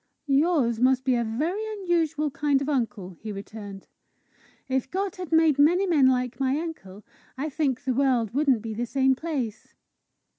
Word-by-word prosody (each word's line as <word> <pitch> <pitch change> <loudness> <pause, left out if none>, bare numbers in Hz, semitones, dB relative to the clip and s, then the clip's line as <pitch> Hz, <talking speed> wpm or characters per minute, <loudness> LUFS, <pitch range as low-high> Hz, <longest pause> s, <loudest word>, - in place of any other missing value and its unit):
"Yours 275 -5 +2
must 260 +1 +3
be 260 - +3
a 240 -1 +1
very 305 - -2
unusual 330 -6 0
kind 285 0 +1
of 275 - -4
uncle!" 225 -10 -2
he 215 - -6
returned. 200 -1 -9 0.8
"If 265 -1 -1
God 380 +2 -3
had 360 -3 -7
made 320 -3 +4
many 350 +7 +4
men 305 -8 +4
like 250 -1 0
my 270 +1 +1
uncle, 215 - -7 0.3
I 295 +4 -2
think 275 -3 -1
the 265 -2 0
world 250 -5 +1
wouldn't 270 -5 +2
be 225 -1 -4
the 240 +3 -3
same 265 +1 +2
place." 260 -7 -5
270 Hz, 170 wpm, -26 LUFS, 235-310 Hz, 0.8 s, made